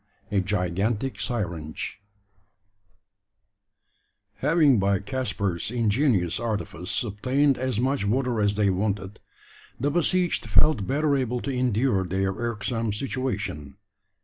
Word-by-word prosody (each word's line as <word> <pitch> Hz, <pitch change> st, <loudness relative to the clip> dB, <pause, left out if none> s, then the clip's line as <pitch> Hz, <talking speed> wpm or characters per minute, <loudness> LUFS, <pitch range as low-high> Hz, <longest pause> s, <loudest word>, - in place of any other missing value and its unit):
A 100 Hz, -, +2 dB
GIGANTIC 100 Hz, +6 st, -1 dB
SYRINGE. 85 Hz, -6 st, -3 dB, 2.4 s
Having 150 Hz, -4 st, +4 dB
by 100 Hz, 0 st, +2 dB
Caspar's 100 Hz, -5 st, -2 dB
ingenious 110 Hz, -, +1 dB
artifice 105 Hz, -, -2 dB
obtained 130 Hz, +6 st, +1 dB
as 130 Hz, -4 st, -1 dB
much 130 Hz, 0 st, +1 dB
water 120 Hz, +1 st, +1 dB
as 105 Hz, 0 st, +2 dB
they 100 Hz, -2 st, +3 dB
wanted, 100 Hz, +1 st, -2 dB, 0.6 s
the 145 Hz, +4 st, +1 dB
besieged 175 Hz, -, +1 dB
felt 105 Hz, 0 st, +4 dB
better 145 Hz, +1 st, +2 dB
able 125 Hz, -2 st, 0 dB
to 140 Hz, -, -3 dB
endure 125 Hz, -4 st, +1 dB
their 95 Hz, +2 st, 0 dB
irksome 115 Hz, 0 st, -2 dB
situation. 105 Hz, -, -3 dB
110 Hz, 105 wpm, -26 LUFS, 100-130 Hz, 2.4 s, Having